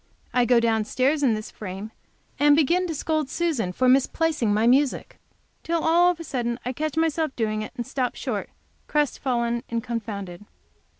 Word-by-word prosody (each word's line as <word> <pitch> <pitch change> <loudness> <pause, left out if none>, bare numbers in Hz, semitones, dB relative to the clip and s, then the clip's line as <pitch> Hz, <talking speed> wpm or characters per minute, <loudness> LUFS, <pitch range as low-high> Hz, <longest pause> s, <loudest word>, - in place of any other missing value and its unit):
I 245 -1 +3
go 240 0 +5
down 225 -2 +2
stairs 275 +6 +1
in 250 -6 +3
this 215 0 -6
frame, 200 +1 -7 0.5
and 290 0 +6
begin 340 +5 +2
to 325 - -3
scold 310 -1 -1
Susan 310 - -1
for 255 +8 +1
misplacing 270 -1 +2
my 215 +2 +2
music, 265 +3 +2 0.4
till 335 -1 -1
all 345 +2 +5
of 355 -2 -2
a - - -6
sudden 240 -5 -2
I 250 - -2
catch 310 +3 -3
myself 320 -3 0
doing 215 -2 -1
it, 215 - -6
and 240 - -3
stop 255 0 -2
short, - - -4 0.4
crestfallen 245 -5 0
and 230 -1 -2
confounded. 210 -6 -5
255 Hz, 175 wpm, -24 LUFS, 230-310 Hz, 0.5 s, and